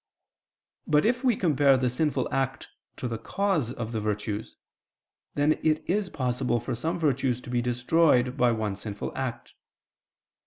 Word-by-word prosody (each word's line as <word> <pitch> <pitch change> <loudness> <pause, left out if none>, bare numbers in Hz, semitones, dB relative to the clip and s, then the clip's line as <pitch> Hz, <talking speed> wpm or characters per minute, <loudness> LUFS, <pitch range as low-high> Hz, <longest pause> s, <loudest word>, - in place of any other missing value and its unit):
But 150 +2 +3
if 245 +3 +1
we 250 -4 +3
compare 145 -7 +4
the 130 0 +1
sinful 130 +1 0
act 135 0 -1 0.3
to 125 - -3
the 115 -2 -4
cause 185 - 0
of 115 -3 -5
the 110 -2 -2
virtues, 105 0 -3 0.8
then 145 +2 +2
it 155 -1 +1
is 200 +1 0
possible 125 -4 -1
for - - -4
some 160 +9 -2
virtues 130 -6 +1
to 120 - -9
be 120 -1 +1
destroyed 125 +1 +2
by 125 -3 +3
one 110 -3 -1
sinful 105 0 -6
act. 125 -3 -4
130 Hz, 155 wpm, -27 LUFS, 120-155 Hz, 0.8 s, compare